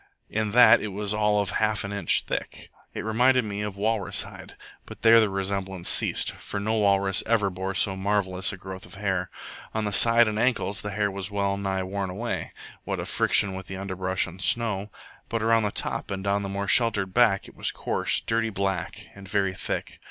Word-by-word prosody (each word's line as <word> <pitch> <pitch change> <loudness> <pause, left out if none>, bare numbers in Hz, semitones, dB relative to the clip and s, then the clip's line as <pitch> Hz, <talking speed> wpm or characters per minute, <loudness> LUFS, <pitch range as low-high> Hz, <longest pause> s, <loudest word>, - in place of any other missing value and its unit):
In 110 0 -1
that 125 +4 +7
it - - -3
was 105 +1 -2
all 105 -1 +2
of 100 -1 -3
half 110 -1 0
an 100 - -5
inch 100 -5 +2
thick, - - -5 0.2
it - - -6
reminded 125 +3 +3
me 105 -1 -4
of 105 -2 -5
walrus 110 0 0
hide; - - -12 0.3
but - - -11
there 115 0 +7
the 110 -2 +3
resemblance 95 -2 -2
ceased, - - +2
for 100 - -6
no 110 +2 -1
walrus 100 -2 +2
ever 105 -4 +2
bore 95 +1 -4
so 95 - +3
marvellous 95 -2 0
a 95 - -8
growth 95 0 -9
of - - -13
hair. 95 -2 -2 0.5
On 110 -1 -1
the 105 - -3
side 115 +2 +6
and 105 0 -2
ankles 115 -4 0
this 105 -1 -5
hair 105 0 0
was 95 0 -4
well 100 -1 -1
nigh 95 -1 -2
worn 95 0 -3
away, 110 +6 -4 0.3
what - - -3
of - - -5
friction 100 -2 +2
with 95 0 -8
underbrush 95 -1 -2
and 90 +1 -10
snow; 105 -1 0 0.4
but 115 -1 -2
around 115 0 +3
the 105 -1 -1
top - - -3
and 95 -1 -4
down 100 0 0
the 100 - -4
more 100 0 -3
sheltered 100 -5 +4
back 110 -5 +3
it - - -14
was - - 0
coarse, - - 0
dirty 115 0 0
black, 95 -3 -3
and 100 -1 -12
very 100 -2 0
thick. - - -5
100 Hz, 205 wpm, -25 LUFS, 95-110 Hz, 0.5 s, that